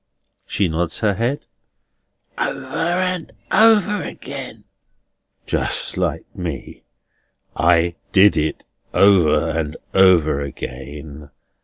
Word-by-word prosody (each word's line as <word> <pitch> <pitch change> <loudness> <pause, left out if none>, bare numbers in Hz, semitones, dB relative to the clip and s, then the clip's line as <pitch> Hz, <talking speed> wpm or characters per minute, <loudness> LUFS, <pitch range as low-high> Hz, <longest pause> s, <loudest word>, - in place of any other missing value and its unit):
She 100 - 0
nods 85 +1 -2
her 105 -2 +2
head. 120 +9 -2 0.9
"Over - - -3
and 175 -3 -1 0.2
over 210 -1 +4
again." - - -8 0.8
"Just - - -2
like - - -2
me! 85 -7 -6 0.7
I 85 0 +3 0.2
did 100 +1 +6
it 80 0 -2 0.3
over 85 -5 +4
and 80 -2 -3 0.2
over 85 -7 +4
again. 70 +2 -8
85 Hz, 95 wpm, -20 LUFS, 75-120 Hz, 0.9 s, did